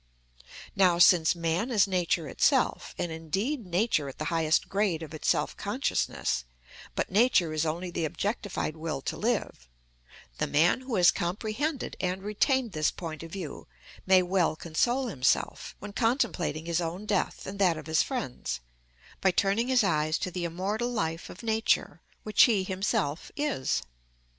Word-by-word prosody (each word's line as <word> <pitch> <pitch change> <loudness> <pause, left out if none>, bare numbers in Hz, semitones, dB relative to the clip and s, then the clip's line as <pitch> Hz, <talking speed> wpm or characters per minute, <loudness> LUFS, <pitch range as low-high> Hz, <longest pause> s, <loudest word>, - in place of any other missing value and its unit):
Now, 180 -3 +4
since 175 -1 +6
man 170 +7 -1
is 215 -5 +4
Nature 175 -4 0
itself, - - +1
and 175 - -2
indeed 195 - -3
Nature 175 -5 +1
at 135 - -11
the 155 - -4
highest 160 -1 +2
grade 195 -5 0
of 160 - -9
its 155 - -2
self - - +1
consciousness, 60 - -1 0.5
but - - -2
Nature 200 -6 +3
is 155 +1 0
only 175 +3 -3
the 170 - -1
objectified 200 -2 -3
will 155 -3 -4
to - - -3
live, 210 - -2 0.7
the - - +1
man 165 - +3
who 255 -3 -4
has 180 -2 +6
comprehended 220 - -3
and 185 +1 -2
retained 230 +4 +1
this 155 -3 +1
point 160 -3 -7
of 165 0 -9
view 175 -7 -7 0.4
may 185 -1 +6
well 180 -2 +1
console 240 - 0
himself, 135 - 0
when 205 0 -9
contemplating 225 - 0
his 170 0 0
own 175 +5 -4
death 205 -3 -1
and 195 +1 -7
that 180 -5 +3
of 155 - -8
his 160 0 +2
friends, 130 - -3 0.6
by 190 - +4
turning 200 +5 +1
his 255 -3 +4
eyes 155 -4 +1
to 185 - -3
the 175 -1 -3
immortal 200 +8 -2
life 165 -8 -2
of 180 - -11
Nature, 225 0 +1 0.2
which 215 -2 +6
he 215 -6 +2
himself 185 -5 -1
is. 290 - 0
180 Hz, 160 wpm, -28 LUFS, 160-215 Hz, 0.7 s, since